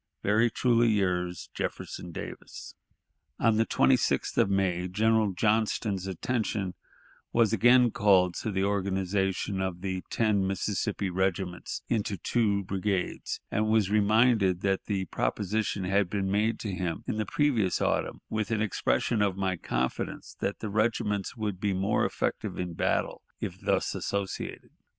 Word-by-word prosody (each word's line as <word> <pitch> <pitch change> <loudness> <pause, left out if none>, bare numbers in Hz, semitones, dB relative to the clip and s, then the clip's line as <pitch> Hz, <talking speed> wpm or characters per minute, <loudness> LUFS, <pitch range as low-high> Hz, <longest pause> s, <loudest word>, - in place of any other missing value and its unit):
"Very 110 +4 +3
truly 120 0 +3
yours, 90 -5 0
"Jefferson 90 - -5
Davis." - - -8 0.6
On 115 -2 +3
the 115 - +2
26th 130 -2 +2
of - - +4
May 95 -2 +1
General 110 +2 +2
Johnston's 105 -1 0
attention 100 -1 -2 0.6
was 115 -2 +3
again 120 +2 +5
called 95 -4 +4
to - - -2
the 95 -2 0
organization 95 0 0
of 95 -2 -3
the 95 -1 -2
ten 105 -4 +1
Mississippi 95 0 -1
regiments 95 -1 -2
into 105 -3 -1
two 100 0 +1
brigades, 95 0 -2
and 110 +1 +1
was 110 -3 +2
reminded 105 -3 +3
that 95 -1 0
the 95 -3 -1
proposition 100 - -1
had 95 0 +1
been 95 0 -1
made 110 +3 +1
to 105 - -3
him 90 -2 -3
in - - -2
the 110 - 0
previous 120 - +1
autumn, - - -1
with 110 -1 -2
an 110 -2 0
expression 110 +1 0
of 100 -2 +1
my 95 -1 0
confidence 65 -6 -3
that 100 - -2
the 110 - -3
regiments 105 -1 0
would 105 -4 -3
be 100 -1 0
more 95 +3 +1
effective - - -2
in 90 -1 -3
battle - - -1 0.2
if - - -5
thus - - +1
associated. 100 -1 -4
100 Hz, 145 wpm, -28 LUFS, 95-110 Hz, 0.6 s, again